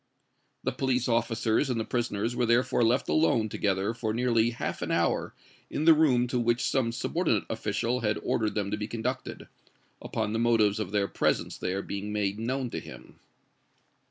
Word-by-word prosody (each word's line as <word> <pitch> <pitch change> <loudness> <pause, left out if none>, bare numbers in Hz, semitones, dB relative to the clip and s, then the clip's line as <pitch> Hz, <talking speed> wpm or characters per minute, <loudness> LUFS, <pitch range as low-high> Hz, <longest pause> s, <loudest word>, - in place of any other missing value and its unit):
The - - 0
police 130 -2 0
officers 115 +2 +1
and 120 -2 0
the 110 - -2
prisoners 120 -1 -1
were 120 - +1
therefore 120 +1 +3
left 120 +3 +2
alone 120 -9 +2
together 100 +1 0
for 110 -2 -3
nearly 120 -2 +2
half 120 - -4
an - - -3
hour - - 0 0.3
in 155 - -2
the 165 - +9
room 140 -6 +3
to 125 - 0
which 120 +1 +1
some 130 -4 +1
subordinate 125 - 0
official 110 +3 -1
had 105 -3 0
ordered 110 -2 0
them 100 -2 -1
to 105 - -1
be 105 0 -4
conducted, 120 +3 -4 0.5
upon 105 - -2
the 115 - 0
motives 115 -3 +3
of 105 -4 -3
their 100 -1 +1
presence - - 0
there 95 +2 -2
being 100 +1 -5
made 105 -1 -1
known 125 +2 -2
to - - -3
him. - - -13
115 Hz, 180 wpm, -28 LUFS, 105-125 Hz, 0.5 s, the